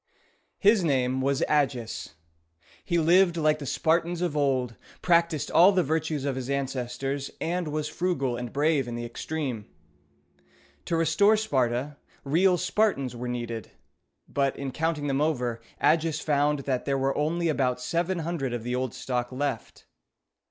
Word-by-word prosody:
His 205 -1 +4
name 130 -4 +1
was 140 +1 +1
A´gis. 130 - -1 0.7
He 170 - 0
lived 170 +2 +4
like 155 -1 +2
the 140 - -6
Spartans 170 +4 +1
of 170 -4 -1
old, 130 -5 0 0.3
practiced 170 -4 +2
all 180 +4 +7
the 185 -2 +2
virtues 155 -1 -1
of 140 -2 -1
his 130 0 -5
ancestors, 135 0 -2
and 175 0 -2
was 150 0 -2
frugal 150 -7 -1
and 120 -1 -5
brave 145 -2 +1
in 120 - -4
the 120 0 -4
extreme. 125 -2 -4 1.2
To 165 - 0
restore 200 +6 +4
Sparta, 135 - -1 0.3
real 180 +6 +3
Spartans 180 - 0
were 125 +1 -5
needed, 120 -3 -5 0.5
but, 140 -1 0
in 140 -1 -4
counting 160 +1 -1
them 140 0 0
over, 125 -7 -1 0.2
Agis 160 -1 +2
found 145 -1 +1
that 130 -2 -2
there 140 -1 0
were 135 0 0
only 165 +3 0
about 130 -5 +1
seven 170 +8 -1
hundred 160 -6 -2
of 115 - -5
the 125 +1 -3
old 125 -2 -2
stock 125 -1 -3
left. 130 -3 -4
145 Hz, 150 wpm, -27 LUFS, 130-165 Hz, 1.2 s, all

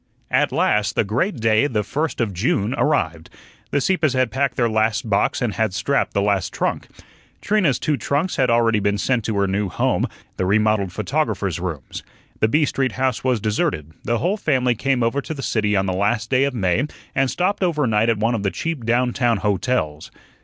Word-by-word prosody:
At - - +2
last 105 0 +1
the - - +3
great 125 - -1
day, 115 +2 +2
the 110 -6 -1
first 150 +9 -2
of 110 -5 0
June, 100 +5 0
arrived. 85 - 0 0.4
The 140 - +1
Sieppes 155 -1 +1
had 130 -2 +1
packed 135 -1 0
their 120 - +2
last 110 +1 0
box 100 +3 +1
and 115 -4 -1
had 105 -1 -1
strapped 140 +2 0
the 100 - +2
last 100 -3 0
trunk. - - -2 0.5
Trina's 185 - +2
two 150 -2 0
trunks 150 +8 -1
had 130 -2 +2
already 115 -2 +3
been 100 0 0
sent 125 +2 0
to 110 -3 -1
her 100 - +2
new 100 +1 -1
home - - 0 0.3
the 95 - 0
remodelled 105 -1 +2
photographer's 105 - -1
rooms. 85 -7 -5 0.4
The 110 - +3
B 150 +7 +3
Street 135 -2 -1
house 130 -2 -1
was 130 -3 +1
deserted; 105 - -1
the 120 +1 0
whole 185 - 0
family 130 - +1
came 130 +1 0
over 115 +5 0
to 160 - -6
the 135 - -6
city 105 -2 0
on 95 0 +2
the 95 - -1
last 105 +5 0
day 130 +1 +4
of 140 -2 -2
May 100 +6 +1 0.3
and 135 -1 +1
stopped 185 +7 -1
over 165 -6 +1
night 110 0 +2
at 115 - +2
one 115 +3 +1
of 115 - -1
the 100 - 0
cheap 160 +2 -4
downtown 120 -1 +2
hotels. 95 -6 -1
115 Hz, 205 wpm, -21 LUFS, 105-135 Hz, 0.5 s, day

